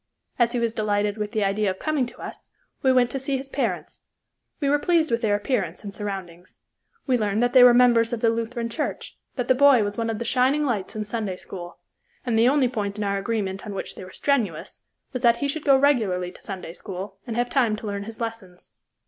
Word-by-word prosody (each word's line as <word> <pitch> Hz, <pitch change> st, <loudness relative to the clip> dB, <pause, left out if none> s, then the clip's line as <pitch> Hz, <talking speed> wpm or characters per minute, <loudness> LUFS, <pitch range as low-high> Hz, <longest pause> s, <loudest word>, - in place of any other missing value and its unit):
As 240 Hz, 0 st, +3 dB
he 245 Hz, -, 0 dB
was 230 Hz, -1 st, 0 dB
delighted 210 Hz, -1 st, 0 dB
with 210 Hz, 0 st, -3 dB
the 215 Hz, -3 st, 0 dB
idea 200 Hz, +1 st, +1 dB
of 185 Hz, -, -3 dB
coming 300 Hz, -2 st, 0 dB
to -, -, -14 dB
us, -, -, -9 dB, 0.3 s
we 265 Hz, -, +4 dB
went 250 Hz, -1 st, +3 dB
to 270 Hz, -, -3 dB
see 270 Hz, +1 st, -1 dB
his 270 Hz, +1 st, -7 dB
parents. -, -, -3 dB, 0.6 s
We 285 Hz, -, 0 dB
were 290 Hz, +1 st, +3 dB
pleased 330 Hz, -2 st, +2 dB
with 230 Hz, 0 st, +1 dB
their 210 Hz, -3 st, +2 dB
appearance 205 Hz, -, -2 dB
and 200 Hz, -1 st, -7 dB
surroundings. 190 Hz, -4 st, -7 dB, 0.4 s
We 255 Hz, -3 st, +2 dB
learned 210 Hz, +1 st, +1 dB
that 245 Hz, -, +1 dB
they 255 Hz, -2 st, +8 dB
were 250 Hz, -, +9 dB
members 235 Hz, -2 st, +5 dB
of 240 Hz, -, -2 dB
the 230 Hz, 0 st, +3 dB
Lutheran 230 Hz, +1 st, -3 dB
Church, 295 Hz, +6 st, -4 dB, 0.2 s
that 250 Hz, -2 st, -2 dB
the -, -, +5 dB
boy 270 Hz, -3 st, +6 dB
was 205 Hz, +2 st, -3 dB
one 230 Hz, 0 st, -1 dB
of 225 Hz, -, -2 dB
the 235 Hz, -, -4 dB
shining 265 Hz, +5 st, +2 dB
lights 220 Hz, -8 st, -2 dB
in 215 Hz, 0 st, -3 dB
Sunday 210 Hz, -4 st, -3 dB
school, 175 Hz, -2 st, -8 dB, 0.5 s
and 240 Hz, -3 st, 0 dB
the 230 Hz, +2 st, +5 dB
only 275 Hz, -2 st, +3 dB
point 210 Hz, -4 st, -3 dB
in 210 Hz, -, -2 dB
our 200 Hz, 0 st, 0 dB
agreement 195 Hz, -2 st, -2 dB
on 205 Hz, -, -5 dB
which -, -, -5 dB
they -, -, -10 dB
were 185 Hz, -, -11 dB
strenuous 220 Hz, -, -1 dB, 0.3 s
was 255 Hz, -, -3 dB
that 235 Hz, -2 st, +4 dB
he 280 Hz, -, -1 dB
should 300 Hz, +2 st, -4 dB
go 275 Hz, -2 st, +6 dB
regularly 215 Hz, -11 st, +2 dB
to -, -, -17 dB
Sunday 185 Hz, -4 st, -7 dB
school 190 Hz, +1 st, -7 dB
and 230 Hz, -, -3 dB
have 240 Hz, +1 st, +1 dB
time 240 Hz, -6 st, +2 dB
to 215 Hz, -, -9 dB
learn 200 Hz, -1 st, -4 dB
his 225 Hz, +1 st, -9 dB
lessons. 225 Hz, -6 st, -7 dB
230 Hz, 235 wpm, -24 LUFS, 200-250 Hz, 0.6 s, were